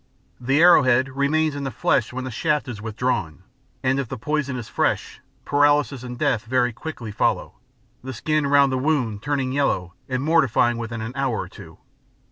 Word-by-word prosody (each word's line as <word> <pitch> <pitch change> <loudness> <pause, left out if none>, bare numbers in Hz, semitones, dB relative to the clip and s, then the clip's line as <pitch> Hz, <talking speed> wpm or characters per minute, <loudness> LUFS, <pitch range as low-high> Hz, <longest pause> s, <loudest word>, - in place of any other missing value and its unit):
The 135 +4 +1
arrow 170 -1 +7
head 130 0 +2
remains 145 +3 +1
in 145 0 -5
the 135 - -2
flesh 120 -2 0
when 130 +1 -5
the 130 - -5
shaft 150 +4 0
is 115 -4 -6
withdrawn, 110 - -2 0.4
and 130 +1 +1
if 135 - -2
the 135 - -5
poison 145 +1 -2
is 120 -3 -6
fresh, - - -1 0.2
paralysis 145 -2 +2
and 125 -1 -7
death 115 -2 0
very 125 0 +1
quickly 120 -4 -7
follow, 105 - -1 0.4
the 130 - -5
skin 145 +4 0
round 140 -1 +4
the 130 - 0
wound 130 -8 0
turning 135 -2 -1
yellow 110 -11 0 0.2
and 130 0 -1
mortifying 135 -7 +2
within 115 -1 -5
an 110 +2 -5
hour 135 -5 -1
or - - -6
two. - - -13
130 Hz, 185 wpm, -23 LUFS, 120-145 Hz, 0.4 s, arrow